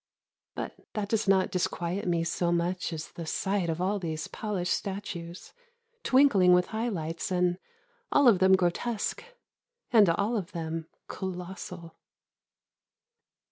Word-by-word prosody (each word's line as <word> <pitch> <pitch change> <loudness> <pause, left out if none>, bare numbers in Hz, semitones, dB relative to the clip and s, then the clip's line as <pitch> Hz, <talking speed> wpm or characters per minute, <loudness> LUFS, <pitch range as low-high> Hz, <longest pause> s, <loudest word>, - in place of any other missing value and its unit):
But - - -5
that 205 -2 -3
does 220 -1 0
not 190 -2 +3
disquiet 180 +1 -2
me 170 -1 +1
so 170 +1 0
much 175 +1 0
as 160 -1 -6
the 165 -2 -7
sight 190 0 0
of 165 +1 -2
all 195 +3 0
these 160 -3 -4
polished 200 -5 -2
statues 190 -4 -5 0.5
twinkling 245 - +5
with 180 0 +3
high 225 +2 0
lights 165 -4 -3
and 180 0 +1 0.5
all 285 -2 +5
of 210 -6 +6
them 190 +1 +5
grotesque 190 +5 -1 0.7
and 215 -6 +6
all 200 +7 +1
of 185 -5 -5
them 165 -1 -4 0.2
colossal. 180 -2 -7
180 Hz, 135 wpm, -28 LUFS, 170-200 Hz, 0.7 s, of